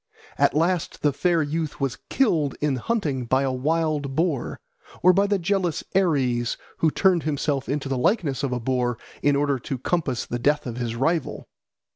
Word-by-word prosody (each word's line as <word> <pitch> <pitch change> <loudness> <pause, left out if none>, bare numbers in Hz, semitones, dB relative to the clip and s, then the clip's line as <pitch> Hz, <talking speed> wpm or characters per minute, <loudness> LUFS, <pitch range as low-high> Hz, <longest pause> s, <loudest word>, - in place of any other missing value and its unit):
At - - +3
last 170 0 0
the 145 -2 +3
fair 170 +2 +2
youth 155 +1 -3
was 135 -3 -2
killed 165 - +2
in 145 -3 0
hunting 145 - -1
by 130 +3 +2
a 135 - 0
wild 150 0 -1
boar, 160 -5 -1 0.4
or 185 +1 +7
by 200 +2 +3
the 200 0 +2
jealous 180 -2 0
Ares, 130 -10 +1 0.2
who 160 - +3
turned 180 +1 +3
himself 145 -2 -1
into 140 0 -1
the 135 -2 -1
likeness 145 - +1
of 140 -3 -1
a 125 - -1
boar 120 -1 0 0.2
in 145 0 +3
order 140 -1 +1
to 135 +2 -4
compass 135 -2 -1
the 120 - -4
death 145 +4 +1
of 120 -2 -5
his 120 -2 -3
rival. 155 +5 -1
145 Hz, 180 wpm, -24 LUFS, 130-165 Hz, 0.4 s, or